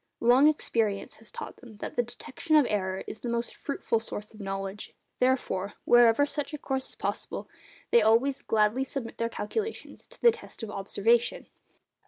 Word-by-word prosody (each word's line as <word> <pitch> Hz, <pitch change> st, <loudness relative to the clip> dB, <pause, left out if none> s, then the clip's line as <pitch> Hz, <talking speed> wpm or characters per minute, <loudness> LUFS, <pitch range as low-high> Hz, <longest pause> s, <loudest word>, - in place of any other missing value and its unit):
Long 250 Hz, +5 st, +6 dB
experience 225 Hz, -9 st, 0 dB
has 220 Hz, -1 st, -13 dB
taught -, -, -8 dB
them 230 Hz, -5 st, -14 dB
that -, -, -6 dB
the -, -, +3 dB
detection 245 Hz, +6 st, -3 dB
of 300 Hz, -3 st, +7 dB
error 190 Hz, -2 st, -1 dB
is -, -, -7 dB
the 240 Hz, -, -3 dB
most 235 Hz, 0 st, -2 dB
fruitful 275 Hz, -5 st, -1 dB
source 210 Hz, -1 st, -6 dB
of 215 Hz, -, -14 dB
knowledge; 195 Hz, 0 st, -5 dB, 0.2 s
therefore, 250 Hz, -7 st, 0 dB
wherever 240 Hz, +3 st, +6 dB
such 295 Hz, +1 st, -2 dB
a -, -, -5 dB
course 265 Hz, -2 st, -3 dB
is -, -, -9 dB
possible, -, -, -4 dB, 0.4 s
they 235 Hz, -, +7 dB
always 235 Hz, +6 st, +3 dB
gladly 220 Hz, +4 st, +2 dB
submit 265 Hz, -3 st, -5 dB
their 230 Hz, 0 st, 0 dB
calculations 430 Hz, -, -4 dB
to -, -, -16 dB
the 475 Hz, -, +7 dB
test 450 Hz, -, -10 dB
of 215 Hz, -, -5 dB
observation. 220 Hz, +4 st, +1 dB
235 Hz, 175 wpm, -28 LUFS, 210-265 Hz, 0.4 s, of